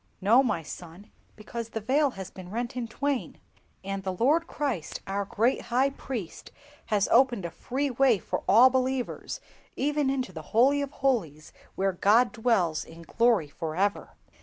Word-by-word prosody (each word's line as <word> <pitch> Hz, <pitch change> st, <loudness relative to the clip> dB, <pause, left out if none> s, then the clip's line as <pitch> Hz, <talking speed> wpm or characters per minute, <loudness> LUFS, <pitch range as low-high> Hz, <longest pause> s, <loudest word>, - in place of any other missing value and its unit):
"No, 225 Hz, +7 st, +5 dB
my 225 Hz, -11 st, -1 dB
son, 175 Hz, +5 st, -10 dB, 0.2 s
because 230 Hz, +2 st, -7 dB
the 225 Hz, -, -4 dB
Veil 275 Hz, +7 st, +2 dB
has 190 Hz, -2 st, -7 dB
been 185 Hz, -1 st, -10 dB
rent 235 Hz, +4 st, -4 dB
in 245 Hz, -2 st, -3 dB
twain, 275 Hz, +3 st, -2 dB, 0.5 s
and 195 Hz, 0 st, -4 dB
the 190 Hz, -1 st, -3 dB
Lord 295 Hz, -, +2 dB
Christ, 255 Hz, -, -3 dB
our 200 Hz, +1 st, -2 dB
great 230 Hz, +6 st, +1 dB
High 260 Hz, +3 st, +2 dB
Priest, 240 Hz, -10 st, -7 dB, 0.4 s
has 210 Hz, -2 st, +1 dB
opened 240 Hz, -6 st, +3 dB
a 170 Hz, -, -4 dB
free 270 Hz, -, -2 dB
way 250 Hz, -2 st, +4 dB
for -, -, -4 dB
all 240 Hz, +6 st, +7 dB
believers, 260 Hz, -1 st, -2 dB, 0.4 s
even 290 Hz, 0 st, 0 dB
into 260 Hz, -8 st, -2 dB
the 160 Hz, -, -6 dB, 0.2 s
Holy 275 Hz, +4 st, +5 dB
of 280 Hz, -, -3 dB
holies 220 Hz, -, -2 dB, 0.2 s
where 195 Hz, 0 st, 0 dB
God 225 Hz, +7 st, +4 dB
dwells 220 Hz, -10 st, +1 dB
in 165 Hz, +1 st, -13 dB
glory 230 Hz, -4 st, +2 dB
for 155 Hz, +2 st, -5 dB
ever!" 200 Hz, +3 st, -1 dB
230 Hz, 165 wpm, -27 LUFS, 190-260 Hz, 0.5 s, all